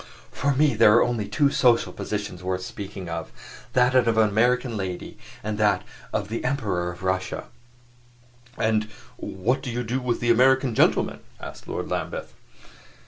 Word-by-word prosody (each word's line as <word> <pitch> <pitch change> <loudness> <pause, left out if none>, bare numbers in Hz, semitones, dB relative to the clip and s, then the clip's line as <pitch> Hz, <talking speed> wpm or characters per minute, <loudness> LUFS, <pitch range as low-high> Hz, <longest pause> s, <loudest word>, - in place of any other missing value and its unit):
"For 140 0 0
me, 150 +1 +4
there 105 - +6
are 120 - +6
only 115 -4 -1
two 145 -2 +2
social 120 -4 +3
positions 105 -4 -4
worth 90 0 -2
speaking 100 -1 -7
of 85 -1 -5 0.4
that 125 0 +4
of 125 -2 +4
an 110 -1 +5
American 120 +3 +2
lady 95 -3 -5 0.3
and 105 0 -3
that 105 -1 +3 0.3
of 100 - -1
the 115 - -3
Emperor 105 -10 -1
of 90 +2 -12
Russia." 95 0 -2 1.1
"And 110 -1 +1 0.3
what 110 +8 -1
do 130 - -5
you 120 +1 -2
do 120 +3 -1
with 125 -2 -1
the 120 0 +2
American 130 +1 +4
gentlemen?" - - +2 0.2
asked - - -9
Lord - - -4
Lambeth. - - -3
110 Hz, 160 wpm, -25 LUFS, 100-125 Hz, 1.1 s, there